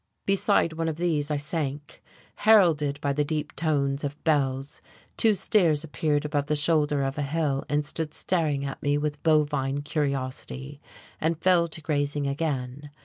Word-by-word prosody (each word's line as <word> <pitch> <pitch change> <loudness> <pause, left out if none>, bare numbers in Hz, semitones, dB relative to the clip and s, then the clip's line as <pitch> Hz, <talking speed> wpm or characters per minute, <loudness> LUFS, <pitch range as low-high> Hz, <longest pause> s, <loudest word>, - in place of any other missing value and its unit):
Beside 195 -4 +2
one 165 0 -2
of 160 - -3
these 155 -3 -1
I 150 - 0
sank. 145 0 -4 0.4
Heralded 160 -10 +4
by 140 -1 0
the 150 +1 +1
deep 150 0 -3
tones 140 -3 0
of 145 +1 -5
bells, 140 -2 0 0.3
two 220 -2 +4
steers 170 -7 +2
appeared 150 0 -1
above 145 -1 -1
the 150 - +1
shoulder 150 -2 +2
of 135 +2 -3
a - - 0
hill 145 -1 -1
and 145 0 0
stood 155 0 -4
staring 150 -6 0
at 135 - -6
me 145 -1 +1
with 145 0 -3
bovine 145 -3 +1
curiosity, 140 -1 -3 0.4
and 160 +1 0
fell 175 -1 +4
to 160 0 -8
grazing 145 -2 -1
again. 140 -1 -3
150 Hz, 160 wpm, -26 LUFS, 140-160 Hz, 0.4 s, Heralded